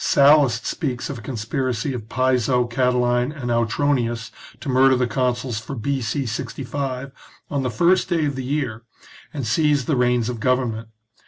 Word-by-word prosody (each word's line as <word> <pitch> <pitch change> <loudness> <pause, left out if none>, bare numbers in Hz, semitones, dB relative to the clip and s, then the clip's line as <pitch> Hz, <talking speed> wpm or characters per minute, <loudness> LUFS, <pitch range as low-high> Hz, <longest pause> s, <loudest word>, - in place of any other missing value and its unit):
Sallust 140 -4 +4
speaks 135 -6 -3
of 135 - -6
a - - -10
conspiracy 125 +2 -2
of 110 -3 -7
Piso, 125 -1 +2
Catiline, 125 +1 +1
and 120 -2 -2
Autronius 120 0 0 0.3
to - - -9
murder 130 0 +5
the 125 0 +1
consuls 125 -1 -1
for 135 +5 -7
B.C. 135 +2 -2
65 135 +3 -4 0.4
on 140 -2 0
the 130 - -1
first 175 +8 +2
day 165 -3 +1
of 140 -2 -2
the 130 - -4
year, 130 -5 -2 0.5
and 140 -5 -4
seize 145 +3 +2
the 155 - +1
reins 125 -2 +2
of 120 -2 -4
government. 120 -3 0
125 Hz, 160 wpm, -22 LUFS, 120-140 Hz, 0.5 s, murder